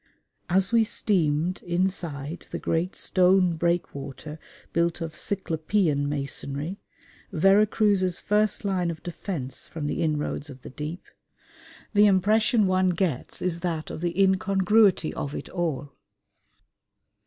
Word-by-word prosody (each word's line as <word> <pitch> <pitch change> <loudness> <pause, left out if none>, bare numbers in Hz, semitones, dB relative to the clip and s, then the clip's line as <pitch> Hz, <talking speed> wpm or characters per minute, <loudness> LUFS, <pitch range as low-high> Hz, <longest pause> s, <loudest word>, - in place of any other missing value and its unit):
As 190 +3 +3
we 230 -1 +5
steamed 175 -5 +1
inside 175 -4 -2
the - - -4
great 170 +3 -1
stone 185 -1 +3
breakwater 155 -3 -3 0.3
built 170 0 +1
of 165 -2 -5
cyclopean 160 -5 0
masonry, 145 +4 -4 0.5
Vera 195 +4 +4
Cruz's 200 -5 +2
first 210 0 +1
line 185 -3 0
of 165 -1 -6
defence 160 -7 -5
from 155 -3 -6
the 150 - -2
inroads 150 -2 -2
of 130 -2 -12
the - - -9
deep, 150 +6 -6 0.9
the 210 0 +6
impression 210 +3 +3
one 185 0 +2
gets 175 -7 -2
is 175 -2 -1
that 170 -3 -3
of - - -7
the 175 +1 -2
incongruity 195 -1 +3
of 145 0 -5
it - - -6
all. 150 -6 -3
175 Hz, 125 wpm, -26 LUFS, 155-195 Hz, 0.9 s, the